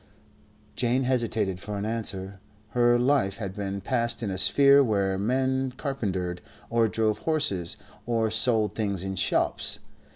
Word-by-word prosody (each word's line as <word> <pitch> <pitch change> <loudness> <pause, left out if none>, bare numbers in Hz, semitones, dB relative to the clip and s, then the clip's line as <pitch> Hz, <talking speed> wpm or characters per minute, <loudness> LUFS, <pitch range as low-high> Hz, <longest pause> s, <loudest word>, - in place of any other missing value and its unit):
Jane 125 +2 +1
hesitated 115 -7 0
for 105 +2 -5
an 100 - -3
answer. 100 -4 -3 0.3
Her 120 +1 +3
life 120 -6 +1
had 100 -4 -5
been 100 -1 -4
passed 120 +1 -1
in 100 - -2
a 95 - -3
sphere 140 +5 +6
where 100 -5 0
men 130 +4 0
carpentered 95 - -3 0.3
or 115 -1 +3
drove 110 0 0
horses 150 - 0 0.3
or 115 -2 +1
sold 110 -1 +2
things 100 -4 -2
in 95 0 -4
shops. - - 0
110 Hz, 140 wpm, -26 LUFS, 100-125 Hz, 0.3 s, sphere